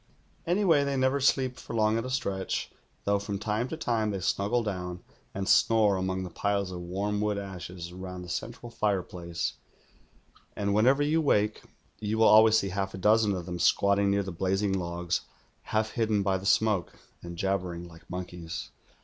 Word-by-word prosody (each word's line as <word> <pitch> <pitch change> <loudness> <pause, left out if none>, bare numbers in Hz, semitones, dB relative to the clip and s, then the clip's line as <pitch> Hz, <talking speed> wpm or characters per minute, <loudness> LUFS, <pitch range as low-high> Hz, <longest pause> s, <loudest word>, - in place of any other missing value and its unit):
Anyway, 175 -5 +3
they 140 -1 -1
never 130 +2 +2
sleep 130 -2 +2
for - - -7
long 110 0 +3
at 115 +1 -1
a - - -4
stretch, 100 -7 -2 0.3
though 100 0 +2
from 100 0 -4
time 105 +4 -1
to 160 - -5
time 115 -7 0
they 100 -2 -2
snuggle 100 +6 0
down 90 -4 -4 0.3
and 95 0 -4
snore 110 -3 +4
among 95 0 -2
the 90 - -7
piles 100 0 -1
of 90 -1 -6
warm 100 +4 -2
wood 105 -1 0
ashes 90 -3 -7
round 90 -1 -7
the - - -11
central 115 +6 -5
fireplace, 90 -5 -2 1.0
and 100 -1 0
whenever 130 +7 +4
you 155 +3 +2
wake, 105 -7 +2 0.4
you 110 +1 -2
will 110 - +5
always 110 +1 +7
see 100 -2 0
half 95 0 -3
a - - -6
dozen 105 +1 +3
of 90 -2 -5
them 90 0 -5
squatting 100 +3 +3
near 100 0 +2
the 95 - -5
blazing 95 +3 0
logs, 85 -2 -1 0.4
half 110 0 0
hidden 110 -3 +1
by 95 -1 +1
the 95 +1 -3
smoke, 105 -4 +2 0.3
and 85 0 -8
jabbering 90 -2 -2
like 80 -1 -16
monkeys. 90 -2 -6
100 Hz, 180 wpm, -28 LUFS, 90-110 Hz, 1.0 s, always